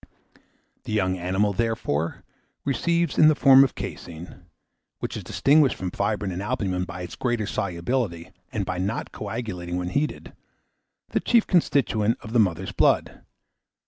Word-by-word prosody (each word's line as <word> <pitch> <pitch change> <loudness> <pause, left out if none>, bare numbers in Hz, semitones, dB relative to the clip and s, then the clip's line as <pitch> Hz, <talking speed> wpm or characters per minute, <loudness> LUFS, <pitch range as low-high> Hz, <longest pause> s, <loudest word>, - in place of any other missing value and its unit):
The - - -4
young 95 -3 +1
animal, 95 +4 +1
therefore, 95 -8 -1 0.4
receives 170 +6 0
in 155 - +8
the 155 - +5
form 135 -2 +7
of 135 - -1
caseine, 85 +2 -8 0.5
which - - -5
is - - -5
distinguished 145 -1 +3
from 90 -1 -4
fibrine 100 0 -1
and 90 +1 -4
albumen 100 -5 -1
by 90 0 -7
its 90 - -7
great 120 -2 -1
solubility, 95 -2 -2 0.2
and - - -2
by 90 0 -3
not 100 +4 -2
coagulating 100 -5 -5
when 90 0 -2
heated, 145 +10 -2 0.8
the - - 0
chief 235 -2 +3
constituent 120 - +2
of 110 - -9
the 120 - +4
mother's 95 -3 +1
blood. - - +1
105 Hz, 145 wpm, -25 LUFS, 90-125 Hz, 0.8 s, in